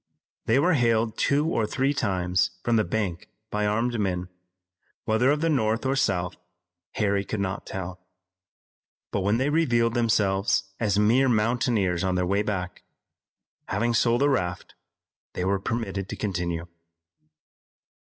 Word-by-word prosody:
They -, -, +4 dB
were 175 Hz, +6 st, +3 dB
hailed 115 Hz, -4 st, +2 dB
two 145 Hz, +2 st, +2 dB
or 115 Hz, -10 st, 0 dB
three 135 Hz, +4 st, 0 dB
times 90 Hz, -7 st, 0 dB
from 120 Hz, -, +2 dB
the 110 Hz, -, +3 dB
bank 90 Hz, -3 st, -3 dB, 0.2 s
by 105 Hz, 0 st, 0 dB
armed 115 Hz, +3 st, 0 dB
men, 90 Hz, -3 st, -1 dB, 0.8 s
whether 110 Hz, +4 st, +2 dB
of 150 Hz, +1 st, +2 dB
the 165 Hz, -, +2 dB
North 115 Hz, -5 st, +1 dB
or 135 Hz, +1 st, +1 dB
South 90 Hz, -8 st, 0 dB, 0.6 s
Harry 100 Hz, -2 st, +1 dB
could 105 Hz, +2 st, -4 dB
not 100 Hz, 0 st, -3 dB
tell, 90 Hz, -1 st, -6 dB, 1.1 s
but -, -, 0 dB
when 100 Hz, +4 st, +2 dB
they 135 Hz, +4 st, 0 dB
revealed 120 Hz, -8 st, +2 dB
themselves 105 Hz, -5 st, +2 dB, 0.2 s
as 105 Hz, -3 st, +1 dB
mere 120 Hz, +6 st, +4 dB
mountaineers 110 Hz, -5 st, +1 dB
on 95 Hz, -1 st, 0 dB
their 90 Hz, 0 st, +1 dB
way 100 Hz, +3 st, +1 dB
back, 95 Hz, -4 st, -4 dB, 0.9 s
having 120 Hz, 0 st, 0 dB
sold 120 Hz, +2 st, +2 dB
a 145 Hz, -, +4 dB
raft, 90 Hz, -9 st, -2 dB, 0.6 s
they 90 Hz, -, -2 dB
were 95 Hz, +1 st, +1 dB
permitted 100 Hz, -3 st, -3 dB
to -, -, -4 dB
continue. 85 Hz, -4 st, -3 dB
105 Hz, 145 wpm, -26 LUFS, 95-120 Hz, 1.1 s, They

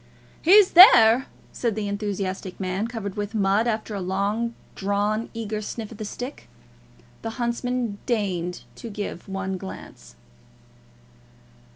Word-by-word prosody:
"He's 385 Hz, +3 st, +6 dB
there," 255 Hz, -, +8 dB, 0.2 s
said 235 Hz, -4 st, -2 dB
the 215 Hz, -2 st, -3 dB
enthusiastic 200 Hz, -2 st, -4 dB
man, 190 Hz, +3 st, -2 dB
covered 220 Hz, -5 st, -5 dB
with 205 Hz, +1 st, -4 dB
mud, 205 Hz, +2 st, +2 dB
after 220 Hz, -1 st, -2 dB
a 200 Hz, -, -3 dB
long 200 Hz, +5 st, -1 dB, 0.2 s
drawn, 205 Hz, +3 st, -1 dB
eager 215 Hz, -2 st, -3 dB
sniff 220 Hz, +1 st, -6 dB
at 225 Hz, -, -11 dB
the 215 Hz, -, -4 dB
stick. 250 Hz, +6 st, -7 dB, 0.7 s
The 225 Hz, -, -4 dB
huntsman 240 Hz, -2 st, -2 dB
deigned 185 Hz, -7 st, -2 dB
to 230 Hz, -, -7 dB
give 200 Hz, -3 st, -6 dB
one 190 Hz, -1 st, -3 dB
glance. 190 Hz, -, -10 dB
210 Hz, 130 wpm, -24 LUFS, 195-230 Hz, 0.7 s, there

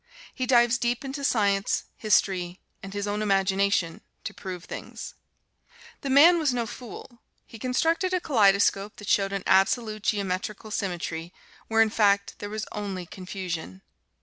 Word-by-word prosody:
He 255 Hz, -1 st, -3 dB
dives 240 Hz, 0 st, +4 dB
deep 240 Hz, +2 st, -1 dB
into 275 Hz, +1 st, -5 dB
science, 200 Hz, -6 st, +1 dB
history 185 Hz, -4 st, +1 dB, 0.2 s
and 195 Hz, -, -8 dB
his 205 Hz, 0 st, -3 dB
own 205 Hz, +1 st, -2 dB
imagination 195 Hz, -3 st, +1 dB, 0.2 s
to -, -, -5 dB
prove 180 Hz, -3 st, -7 dB
things. -, -, -8 dB, 0.9 s
The 275 Hz, -, -4 dB
man 325 Hz, +6 st, +7 dB
was 290 Hz, -6 st, +1 dB
no 235 Hz, -1 st, 0 dB
fool 240 Hz, +1 st, -10 dB, 0.2 s
he 225 Hz, -, -12 dB
constructed 325 Hz, -, +1 dB
a 365 Hz, -, +1 dB
kaleidoscope 200 Hz, -, +3 dB
that 205 Hz, -, -11 dB
showed 195 Hz, -1 st, +2 dB
an 195 Hz, -1 st, -3 dB
absolute, 215 Hz, +3 st, +2 dB
geometrical 205 Hz, +2 st, -2 dB
symmetry, 175 Hz, -3 st, -4 dB, 0.3 s
where 225 Hz, 0 st, +4 dB
in 220 Hz, -, -2 dB
fact 200 Hz, -2 st, +2 dB
there 205 Hz, -, -5 dB
was 215 Hz, +1 st, -4 dB
only 195 Hz, -3 st, -4 dB
confusion. 180 Hz, -, -6 dB
205 Hz, 150 wpm, -26 LUFS, 195-240 Hz, 0.9 s, man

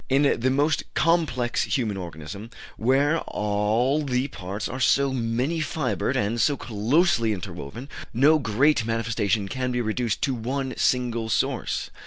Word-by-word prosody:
In 135 Hz, +2 st, +3 dB
the 140 Hz, +3 st, +2 dB, 0.2 s
complex 150 Hz, -8 st, +1 dB
human 115 Hz, -6 st, -1 dB
organism, 90 Hz, +4 st, -7 dB, 0.3 s
where 140 Hz, +7 st, +2 dB
all 105 Hz, +7 st, 0 dB
the 130 Hz, 0 st, -1 dB
parts 100 Hz, -2 st, -5 dB
are 130 Hz, -, -5 dB
so 135 Hz, +1 st, +3 dB
many 125 Hz, +6 st, -1 dB
fibred 155 Hz, -4 st, -1 dB
and 110 Hz, +3 st, 0 dB
so 145 Hz, +4 st, +2 dB
closely 115 Hz, -, +2 dB
interwoven, 95 Hz, -, -7 dB, 0.2 s
no 145 Hz, +6 st, +4 dB
great 130 Hz, +3 st, +2 dB
manifestation 110 Hz, -2 st, 0 dB
can 130 Hz, +4 st, -2 dB
be 125 Hz, -, -1 dB
reduced 115 Hz, -1 st, -1 dB
to 135 Hz, -, +1 dB
one 130 Hz, +3 st, -3 dB
single 120 Hz, -3 st, 0 dB
source. 105 Hz, -, -1 dB
125 Hz, 135 wpm, -25 LUFS, 110-140 Hz, 0.3 s, no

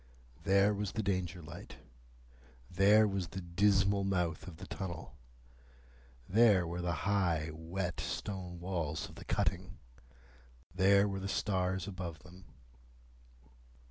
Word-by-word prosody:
There 100 Hz, +2 st, +4 dB
was 100 Hz, -2 st, -3 dB
the 110 Hz, -, -1 dB
Danger 90 Hz, -3 st, -2 dB
light. 80 Hz, +3 st, -10 dB, 1.0 s
There 105 Hz, +4 st, +5 dB
was 95 Hz, -3 st, -2 dB
the 95 Hz, -, -6 dB
dismal 100 Hz, +2 st, +2 dB
mouth 90 Hz, -4 st, -1 dB
of 85 Hz, -3 st, -9 dB
the 95 Hz, -, -8 dB
tunnel. 90 Hz, -4 st, -6 dB, 1.1 s
There 105 Hz, -3 st, +5 dB
were 85 Hz, +1 st, -4 dB
the 85 Hz, 0 st, -1 dB
high, 85 Hz, -6 st, +1 dB
wet 85 Hz, +1 st, -4 dB
stone 90 Hz, +1 st, -4 dB
walls 85 Hz, -4 st, -2 dB
of -, -, -13 dB
the -, -, -11 dB
cutting. 95 Hz, 0 st, -1 dB, 1.0 s
There 100 Hz, +2 st, +5 dB
were 95 Hz, -1 st, -3 dB
the 95 Hz, -, -4 dB
stars 95 Hz, -2 st, 0 dB
above 90 Hz, -4 st, -5 dB
them. 90 Hz, +1 st, -14 dB
95 Hz, 125 wpm, -33 LUFS, 85-100 Hz, 1.1 s, There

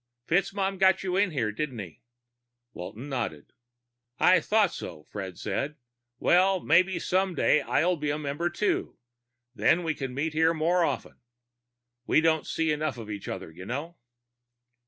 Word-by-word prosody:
"FitzMaugham 195 Hz, +2 st, 0 dB
got 190 Hz, 0 st, +4 dB
you 185 Hz, -1 st, -1 dB
in 200 Hz, 0 st, +3 dB
here, 120 Hz, -10 st, -1 dB
didn't 130 Hz, +2 st, -4 dB
he?" 95 Hz, -7 st, -8 dB, 0.7 s
Walton 110 Hz, +9 st, -7 dB
nodded. 115 Hz, -, -4 dB, 0.6 s
"I 185 Hz, +1 st, +5 dB
thought 210 Hz, -4 st, +2 dB
so," 75 Hz, -2 st, -7 dB
Fred 95 Hz, -2 st, -7 dB
said. 140 Hz, +9 st, -3 dB, 0.4 s
"Well, 185 Hz, +6 st, +4 dB
maybe 185 Hz, +2 st, +3 dB
someday 185 Hz, -5 st, +2 dB
soon -, -, -11 dB
I'll 180 Hz, +1 st, +2 dB
be 150 Hz, -1 st, -2 dB
a 145 Hz, -, 0 dB
member 150 Hz, +3 st, -2 dB
too. 190 Hz, +4 st, -1 dB, 0.6 s
Then 170 Hz, +6 st, +3 dB
we 160 Hz, -1 st, 0 dB
can 135 Hz, -4 st, -5 dB
meet 155 Hz, +3 st, -1 dB
here 160 Hz, +1 st, +3 dB
more 170 Hz, +3 st, +2 dB
often. -, -, -3 dB, 0.9 s
We -, -, +4 dB
don't 160 Hz, -1 st, +2 dB
see 160 Hz, -1 st, 0 dB
enough 150 Hz, -3 st, -1 dB
of 110 Hz, -2 st, -7 dB
each 100 Hz, -1 st, -6 dB
other, -, -, -5 dB
you 90 Hz, +4 st, -10 dB
know." 145 Hz, +8 st, -4 dB
155 Hz, 155 wpm, -27 LUFS, 125-180 Hz, 0.9 s, I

